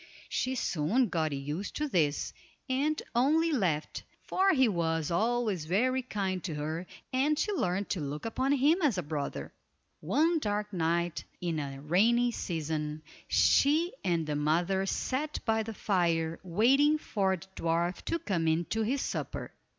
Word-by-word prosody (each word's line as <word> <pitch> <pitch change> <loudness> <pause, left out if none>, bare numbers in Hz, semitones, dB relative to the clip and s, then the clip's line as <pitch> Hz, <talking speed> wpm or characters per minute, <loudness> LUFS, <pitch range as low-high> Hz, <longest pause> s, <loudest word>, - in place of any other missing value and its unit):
She 260 +1 -1
soon 215 - +1
got 160 -3 0
used 145 +7 -4
to 300 - -1
this, 155 - 0 0.3
and 285 +4 0
only 310 +7 +3
laughed, 175 - 0 0.2
for 385 +1 +2
he 265 -7 +4
was 165 -5 0
always 215 -3 0
very 255 +10 +1
kind 195 -7 -3
to 165 -5 -3
her, 160 +4 -3 0.3
and 290 +4 +2
she 420 - 0
learned 200 - -1
to 185 - 0
look 145 +4 -5
upon 260 +4 0
him 295 +7 +3
as 275 - +2
a 180 - -1
brother. 145 -1 -4 0.5
One 325 +2 +2
dark 210 -4 -2
night 170 -1 0 0.2
in 170 -3 -2
the 140 -2 -4
rainy 230 +10 +3
season 155 -5 -3 0.2
she 315 +6 +4
and 170 -4 +1
the 150 -1 -2
mother 175 +6 +1
sat 285 +9 -1
by 220 -1 +2
the 220 0 -6
fire 165 -5 0
waiting 260 - +4
for 195 -9 0
the 170 - -12
dwarf 170 +2 0
to 335 - 0
come 185 - -1
in 160 +2 +2
to 225 - 0
his 255 +5 0
supper. - - -4
190 Hz, 160 wpm, -30 LUFS, 165-255 Hz, 0.5 s, he